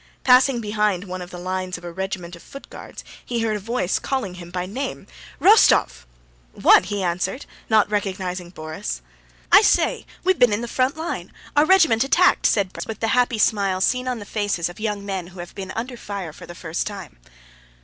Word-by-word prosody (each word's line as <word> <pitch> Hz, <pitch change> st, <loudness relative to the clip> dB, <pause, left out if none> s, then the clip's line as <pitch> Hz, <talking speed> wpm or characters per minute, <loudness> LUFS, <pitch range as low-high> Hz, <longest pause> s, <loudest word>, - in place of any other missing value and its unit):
Passing 250 Hz, -1 st, +5 dB
behind 210 Hz, -3 st, 0 dB
one 185 Hz, -1 st, -6 dB
of 180 Hz, -, -8 dB
the 180 Hz, -, -9 dB
lines 185 Hz, 0 st, -3 dB
of -, -, -14 dB
a 175 Hz, -, -6 dB
regiment 185 Hz, -1 st, -5 dB
of 170 Hz, -, -14 dB
Foot 275 Hz, -, -12 dB
Guards -, -, -10 dB, 0.2 s
he 235 Hz, -2 st, -2 dB
heard 220 Hz, -1 st, 0 dB
a -, -, -3 dB
voice 200 Hz, -3 st, -1 dB
calling 255 Hz, -9 st, -2 dB
him 175 Hz, -1 st, -10 dB
by 180 Hz, 0 st, -3 dB
name. 200 Hz, -, -5 dB, 0.3 s
"Rostóv!" 60 Hz, -, +5 dB, 0.5 s
"What?" -, -, +5 dB
he 200 Hz, -1 st, -3 dB
answered, 185 Hz, +8 st, -2 dB, 0.2 s
not 220 Hz, -2 st, +4 dB
recognizing 185 Hz, -4 st, -3 dB
Borís. 155 Hz, -, -6 dB, 0.5 s
"I -, -, +9 dB
say, -, -, +2 dB, 0.2 s
we've 375 Hz, 0 st, +2 dB
been 245 Hz, -4 st, +5 dB
in 205 Hz, -, -1 dB
the 240 Hz, -, -4 dB
front 260 Hz, +4 st, 0 dB
line! 325 Hz, +2 st, -5 dB, 0.2 s
Our 295 Hz, +1 st, +5 dB
regiment 320 Hz, -11 st, +5 dB
attacked!" 350 Hz, +7 st, +4 dB
said 195 Hz, -3 st, +1 dB
Borís -, -, -6 dB
with 220 Hz, -2 st, -6 dB
the 225 Hz, -, 0 dB
happy 245 Hz, -1 st, +2 dB
smile 200 Hz, -3 st, +2 dB
seen 250 Hz, +6 st, +1 dB
on 250 Hz, -1 st, -1 dB
the 205 Hz, -, -8 dB
faces 205 Hz, -6 st, -1 dB
of 175 Hz, -, -12 dB
young 210 Hz, -2 st, -3 dB
men 190 Hz, -3 st, -4 dB
who 180 Hz, 0 st, -13 dB
have 175 Hz, 0 st, -8 dB
been 190 Hz, -2 st, -7 dB
under 245 Hz, +3 st, -4 dB
fire 195 Hz, -8 st, -6 dB
for -, -, -12 dB
the 175 Hz, -, -10 dB
first 165 Hz, -1 st, -3 dB
time. 195 Hz, -, -8 dB
200 Hz, 200 wpm, -22 LUFS, 180-235 Hz, 0.5 s, I